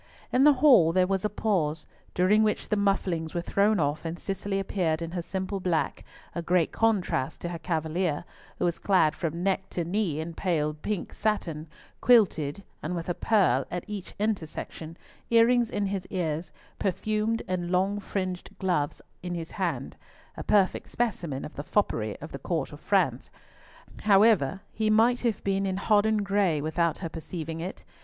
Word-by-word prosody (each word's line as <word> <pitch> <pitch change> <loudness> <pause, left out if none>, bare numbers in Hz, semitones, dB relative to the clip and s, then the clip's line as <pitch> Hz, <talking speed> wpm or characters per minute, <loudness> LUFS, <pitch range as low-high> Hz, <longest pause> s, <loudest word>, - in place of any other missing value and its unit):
In 260 +2 +5
the 295 - +8
hall 200 - +7
there 185 0 +4
was 195 +1 -1
a - - +2
pause, 165 -8 0 0.3
during 195 +4 +4
which 215 -1 0
the - - +2
mufflings 185 -5 0
were 170 - 0
thrown 200 +3 +2
off, 145 0 0
and 165 +1 -4
Cicely 195 +1 -3
appeared 175 -5 0
in 165 0 -5
her 175 0 -2
simple 190 +3 -3
black, 180 -3 -1 0.3
a 170 - -3
great 170 -1 +2
contrast 185 -11 0
to 175 - -3
her 170 -1 -5
cavalier, 160 0 -1 0.3
who - - 0
was 175 -1 0
clad 180 -6 +3
from 170 +1 -3
neck 195 0 0
to 175 - -2
knee 175 -3 -1
in 165 +1 -4
pale 155 -4 0
pink 175 +5 -4
satin, 165 -8 -2 0.3
quilted, 200 -9 +3 0.2
and 165 +4 -3
with 170 0 -4
a - - +1
pearl 185 - +3
at 175 0 -4
each 210 -3 -7
intersection, 170 -5 -4 0.3
earrings 235 0 +4
in 205 -1 -1
his 195 -1 -3
ears, 165 -3 -2 0.3
perfumed 215 +3 0
and 180 -2 -2
long 190 +3 +1
fringed 185 -2 -4
gloves 175 -7 -1 0.2
in 180 -1 -4
his 165 0 -5
hand—a - - -5
perfect 200 -3 +2
specimen 175 - -2
of - - -9
the 145 - -6
foppery 110 - 0
of - - -8
the - - -6
Court - - -2
of - - -10
France. - - +1 0.7
However, 195 -4 +4
he 215 0 0
might 230 +3 +4
have 230 -4 -1
been 195 0 0
in 190 0 -1
hodden 210 +1 +3
gray 195 -6 +2
without 160 +2 0
her - - -3
perceiving 160 0 -6
it. 180 +3 -6
185 Hz, 170 wpm, -27 LUFS, 165-205 Hz, 0.7 s, the